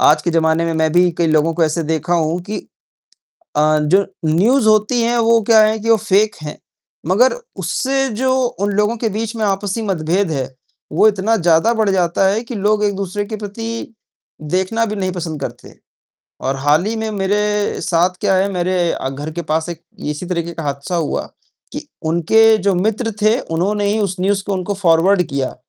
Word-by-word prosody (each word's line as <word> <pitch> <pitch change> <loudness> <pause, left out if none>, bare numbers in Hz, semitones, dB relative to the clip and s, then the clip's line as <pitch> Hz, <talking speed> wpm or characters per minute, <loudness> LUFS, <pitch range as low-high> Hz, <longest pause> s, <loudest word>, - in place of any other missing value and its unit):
आज 150 0 +4
के 175 - 0
जमाने 160 0 +2
में 165 - -1
मैं 160 0 +1
भी 175 +1 +4
कई 170 - +2
लोगों 155 +1 +2
को 165 - +2
ऐसे 160 +2 -1
देखा 160 +2 -1
हूँ 165 +1 0
कि 210 +4 -5 1.0
अ, 155 +1 +3
जो 190 +7 +3 0.2
न्यूज़ 215 - +3
होती 215 +3 +3
है 235 +1 +1
वो 230 0 +4
क्या 220 +1 +5
है 215 +1 +2
कि 225 +2 -2
वो 225 - +6
फेक 210 0 +1
है। 150 -1 -7 0.5
मगर 220 +9 +4 0.3
उससे 270 0 -1
जो 260 0 +2 0.3
उन 205 +1 0
लोगों 210 +3 +1
के 225 0 -1
बीच 220 +2 -4
में 220 - -1
आपसी 200 +2 -1
मतभेद 185 -1 0
है, 135 -4 -2 0.4
वो 190 +8 +5
इतना 210 +2 +1
ज़्यादा 175 +3 +3
बढ़ 220 -2 +1
जाता 180 0 +1
है 210 +4 0
कि 235 - -7
लोग 210 +1 +1
एक 205 -1 0
दूसरे 200 +1 -3
के 215 +1 -6
प्रति 225 +3 -6 0.6
देखना 190 +5 +1
भी 215 - -4
नहीं 185 -2 -2
पसंद 165 -4 -5
करते, 120 -3 -7 0.7
और 135 +1 -2
हाल 145 +5 +2
ही 225 +1 -2
में 220 0 -3
मेरे 210 +1 -1
साथ 175 +1 +2
क्या 200 -2 +2
है, 190 +2 +2
मेरे 180 -1 0 0.2
घर 145 +3 -6
के 170 +2 -4
पास 160 +1 -1
एक 170 - -6 0.3
इसी 150 +5 -7
तरीके 170 -1 -3
का 165 - -6
हादसा 140 +4 -3
हुआ 165 -3 -1 0.5
कि - - -7 0.2
उनके 220 +7 +4
जो 200 -1 +1
मित्र 220 +5 -1
थे 215 +4 +4
उन्होंने 200 +4 -1
ही 210 - 0
उस 195 -3 -1
न्यूज़ 195 +1 +1
को 205 - -2
उनको 185 +2 -3
फॉरवर्ड 180 0 +3
किया। 135 -3 -3
190 Hz, 195 wpm, -18 LUFS, 165-215 Hz, 1.0 s, वो